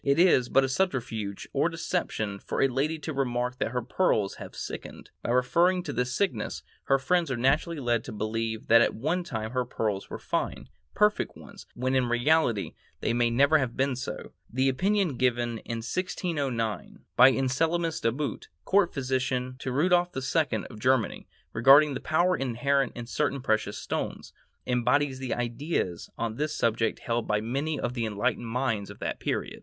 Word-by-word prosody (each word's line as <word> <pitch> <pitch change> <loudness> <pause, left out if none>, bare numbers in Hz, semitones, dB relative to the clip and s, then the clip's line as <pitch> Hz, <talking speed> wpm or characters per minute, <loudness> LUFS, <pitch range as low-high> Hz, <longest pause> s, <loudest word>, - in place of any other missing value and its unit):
It 140 +1 +2
is 165 -8 +5
but 135 - +4
a - - +1
subterfuge 125 - -2
or 145 +4 +2
deception 165 - -2
for - - -4
a 135 - +5
lady 140 +5 -1
to 155 +1 -5
remark 125 -2 -1
that - - 0
her 125 0 -2
pearls 110 - +1
have - - -9
sickened; - - -7
by - - -4
referring 170 +10 +3
to 145 -5 -4
this 125 +1 -1
sickness, 155 - -1 0.2
her 135 - +4
friends 170 +4 +1
are 130 - -1
naturally 145 +6 +1
led 120 -3 0
to - - -6
believe 110 +1 -3
that 115 +1 +6
at - - +2
one 160 +9 -1
time 110 -8 -4
her 125 0 0
pearls 105 -5 -3
were - - -5
fine, - - -3 0.3
perfect 210 0 +2
ones, - - -13
when 130 +2 -1
in 130 -2 +2
reality 120 -3 +2 0.3
they 115 - 0
may 120 0 +2
never 140 +6 +4
have 130 -4 -2
been 135 0 +1
so. 130 - -6 0.2
The 130 +3 +2
opinion 185 +1 +1
given 120 -2 0
in 115 -1 -5
1609, 140 - -2
by 125 +2 +8
Anselmus 160 +6 0
De 115 - +2
Boot, 135 -1 -4 0.2
court 195 -2 +3
physician 130 -1 -1
to 130 - -4
Rudolph 175 +4 +2
II 135 -4 0
of 110 - -10
Germany, 130 -2 +1 0.3
regarding 140 +6 +6
the 130 - -3
power 175 +4 +2
inherent 135 0 0
in 120 - -6
certain 140 +3 -1
precious 110 -4 0
stones, - - -4 0.3
embodies 130 +3 +1
the 130 -3 -2
ideas 120 - -2
on 115 -1 -3
this 150 +1 -2
subject 115 -1 0
held 115 -1 -1
by 105 0 +2
many 135 +7 -2
of 120 - -2
the 115 -3 -1
enlightened 105 +3 -1
minds 115 -4 -1
of 100 - -10
that - - -4
period. - - -3
130 Hz, 180 wpm, -28 LUFS, 115-150 Hz, 0.3 s, by